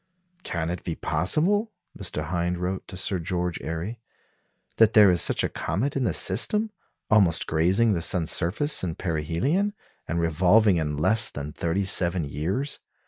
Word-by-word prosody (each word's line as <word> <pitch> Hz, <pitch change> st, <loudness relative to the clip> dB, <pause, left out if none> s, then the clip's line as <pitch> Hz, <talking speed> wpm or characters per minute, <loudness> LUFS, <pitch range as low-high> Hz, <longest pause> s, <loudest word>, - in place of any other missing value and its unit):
"Can 85 Hz, -, -4 dB
it 90 Hz, -, -6 dB
be 85 Hz, -, -4 dB
possible," 205 Hz, -, +2 dB, 0.2 s
Mr. 90 Hz, -6 st, -4 dB
Hind 85 Hz, +2 st, -3 dB
wrote 90 Hz, +2 st, -5 dB
to 95 Hz, -, -9 dB
Sir 95 Hz, 0 st, 0 dB
George 90 Hz, 0 st, -3 dB
Airy, 85 Hz, +8 st, -6 dB, 0.8 s
"that 115 Hz, -1 st, +4 dB
there 105 Hz, -3 st, +6 dB
is 85 Hz, -2 st, +2 dB
such -, -, +2 dB
a -, -, +1 dB
comet 110 Hz, +12 st, -3 dB
in 135 Hz, -2 st, -1 dB
the -, -, -1 dB
system, 210 Hz, -, +2 dB, 0.4 s
almost 95 Hz, -7 st, +3 dB
grazing 95 Hz, +8 st, +1 dB
the 85 Hz, -, -2 dB
sun's 85 Hz, -1 st, +3 dB
surface 105 Hz, -, +2 dB
in 85 Hz, -3 st, -3 dB
perihelion, 90 Hz, -, -2 dB, 0.3 s
and 85 Hz, -, -2 dB
revolving 90 Hz, +5 st, +3 dB
in 75 Hz, -2 st, -3 dB
less 95 Hz, +9 st, +4 dB
than 75 Hz, +1 st, -8 dB
thirty 90 Hz, +4 st, -2 dB
seven 90 Hz, -2 st, +1 dB
years. 90 Hz, -, -4 dB
90 Hz, 160 wpm, -24 LUFS, 85-110 Hz, 0.8 s, there